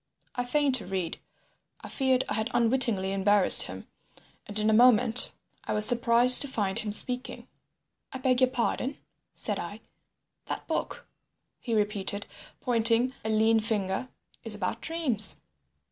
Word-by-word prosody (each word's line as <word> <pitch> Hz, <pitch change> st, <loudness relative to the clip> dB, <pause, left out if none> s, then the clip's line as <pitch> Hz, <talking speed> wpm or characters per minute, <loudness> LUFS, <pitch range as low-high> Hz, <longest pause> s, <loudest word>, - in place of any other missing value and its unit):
I 245 Hz, -, -4 dB
feigned 285 Hz, +2 st, -1 dB
to 215 Hz, -, -11 dB
read. 185 Hz, -3 st, -6 dB, 0.6 s
I -, -, -11 dB
feared 260 Hz, -2 st, -2 dB
I -, -, -5 dB
had 220 Hz, +2 st, -3 dB
unwittingly 230 Hz, -5 st, 0 dB
embarrassed 195 Hz, 0 st, +7 dB
him, -, -, -7 dB, 0.6 s
and 205 Hz, -, -6 dB
in 215 Hz, 0 st, -1 dB
a 220 Hz, -, +1 dB
moment 235 Hz, 0 st, +3 dB, 0.3 s
I -, -, -5 dB
was 210 Hz, 0 st, +4 dB
surprised 240 Hz, +1 st, +6 dB
to 285 Hz, -, +5 dB
find 205 Hz, -7 st, -4 dB
him 215 Hz, -, -6 dB
speaking. 250 Hz, +4 st, -2 dB, 0.6 s
"I -, -, -8 dB
beg 255 Hz, -1 st, -2 dB
your 255 Hz, -, +2 dB
pardon?" 255 Hz, +2 st, -4 dB, 0.4 s
said -, -, -5 dB
I. -, -, -9 dB, 0.7 s
"That -, -, -8 dB
book," -, -, -6 dB, 0.5 s
he 230 Hz, -3 st, -5 dB
repeated, 205 Hz, -1 st, -3 dB, 0.4 s
pointing 235 Hz, 0 st, 0 dB
a 220 Hz, -, -5 dB
lean 220 Hz, +1 st, +1 dB
finger, 210 Hz, +1 st, -4 dB, 0.3 s
"is 225 Hz, -2 st, -2 dB
about 185 Hz, -3 st, -6 dB
dreams." 270 Hz, -12 st, -1 dB
225 Hz, 145 wpm, -25 LUFS, 210-250 Hz, 0.7 s, embarrassed